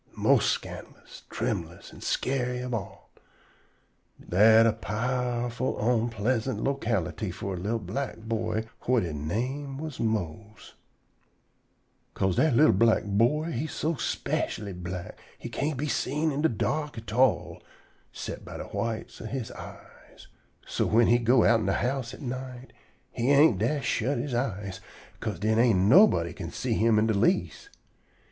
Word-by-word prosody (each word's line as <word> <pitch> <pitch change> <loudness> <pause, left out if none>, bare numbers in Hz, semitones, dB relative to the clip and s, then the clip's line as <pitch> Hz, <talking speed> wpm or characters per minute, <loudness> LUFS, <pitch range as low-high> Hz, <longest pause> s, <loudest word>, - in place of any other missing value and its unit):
mos' - - +3
scandalous, - - -6
trembulous - - -4
an' - - -13
scary 125 -1 -1
ob 125 -1 -4
all. 105 -4 -6 1.2
Dat 110 +5 +6
a 115 - +3
powerful 125 +3 -2
onpleasant 115 +2 0
locality 110 - -1
for 95 +1 -5
a - - -4
li'l 105 +6 -1
black 110 +4 -4
boy 110 0 -2 0.2
whut 125 -3 +3
he 85 -3 -4
name 125 - -3
was 155 -1 -6
Mose. 110 -1 -3 1.4
'Ca'se 95 -2 +1
dat 155 -6 +3
li'l 155 +6 +6
black 115 -1 +3
boy 120 +11 +1
he 135 +4 -2
so 155 +1 -2
specially 105 -5 -2
black 90 0 -7 0.2
he - - -7
can't 145 0 -2
be 150 +3 -2
seen 150 +3 0
in 140 +1 -2
de 160 - +3
dark 150 +6 -2
at 110 -1 -7
all 125 0 +2 0.5
'cept - - -6
by - - -8
de - - -5
whites 115 -1 -4
ob 110 - -6
he 130 -3 -4
eyes. - - -13 0.4
So - - -1
whin 115 +1 +4
he 120 +1 +5
go 120 +1 +4
outen 115 -3 +3
de 95 - +2
house 125 +1 -1
at - - -12
night, 130 0 -6 0.4
he 120 +3 -1
ain't 140 - +5
dast 130 +5 0
shut 130 +5 0
he 135 -5 -3
eyes, 100 -6 -3 0.4
'ca'se 105 -5 -3
den 110 +2 +1
ain't 115 -4 +4
nobody 95 - +5
can 85 -2 -6
see 125 +7 -2
him 110 0 +3
in 105 - +3
de 110 - +1
least. 180 - 0
115 Hz, 155 wpm, -27 LUFS, 105-130 Hz, 1.4 s, Dat